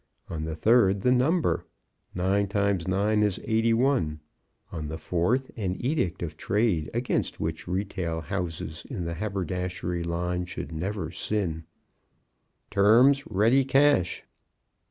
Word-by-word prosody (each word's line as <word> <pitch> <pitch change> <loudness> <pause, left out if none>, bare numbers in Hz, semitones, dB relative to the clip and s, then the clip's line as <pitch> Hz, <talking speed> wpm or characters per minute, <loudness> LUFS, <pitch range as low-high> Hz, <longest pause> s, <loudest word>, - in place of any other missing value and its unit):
On 80 -2 -3
the 80 -1 -4
third 100 +1 +4
the 125 - +3
number, 150 +7 +2 0.5
Nine 95 +3 +1
times 100 -3 0
nine 105 +3 +2
is 105 -3 +1
eighty 110 +1 +2
one. 115 - +1 0.5
On 80 -3 -5
the 80 +2 -5
fourth, 100 +12 0
an 95 -5 -2
edict 120 - -1
of 80 - -5
trade 100 -7 0
against 120 +2 -1
which 80 +1 -3
retail 90 -3 -2
houses 85 -4 -4
in 100 -11 -4
the 85 - -3
haberdashery 90 -2 -3
line 90 +1 -2
should 90 - -6
never 85 +1 -3
sin, 85 -6 -2 1.1
"Terms: 120 +8 +5
Ready 115 +7 +3
cash." 135 -9 +3
95 Hz, 130 wpm, -27 LUFS, 85-115 Hz, 1.1 s, Terms